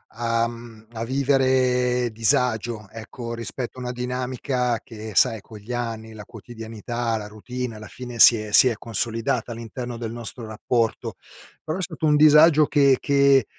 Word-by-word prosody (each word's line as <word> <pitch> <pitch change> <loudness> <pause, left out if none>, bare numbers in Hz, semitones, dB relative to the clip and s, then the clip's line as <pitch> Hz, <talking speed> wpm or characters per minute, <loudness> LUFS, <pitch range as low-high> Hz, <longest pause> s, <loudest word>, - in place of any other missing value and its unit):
a 115 0 0
mhmm, 115 -2 -11
a 115 0 -5
vivere 130 -2 +1
disagio, 115 -3 0
ecco 115 +1 -8
rispetto 120 +2 -6
a - - -7
una 125 - -4
dinamica, 125 -1 -2
che 110 -1 -9
sai 115 -4 +3
con 110 +1 -13
gli 105 +4 -10
anni, 115 -2 -4
la 105 -1 -10
quotidianità, 115 0 -5
la 105 -2 -5
routine, 125 +3 -6
alla 110 0 -10
fine 125 -2 -9
si 115 - +8
è 105 -1 -6
si 130 - +7
è 120 - 0
consolidata, 115 +1 -2
all'interno 120 +2 -7
del 115 -1 -5
nostro 120 0 -6
rapporto. 110 +1 -2 0.5
Però, 155 +2 -3
è - - -4
stato 160 -2 -4
un 150 -1 +4
disagio 155 +1 +6
che 140 -3 +4
che, 140 -3 +4
120 Hz, 165 wpm, -23 LUFS, 115-125 Hz, 0.5 s, si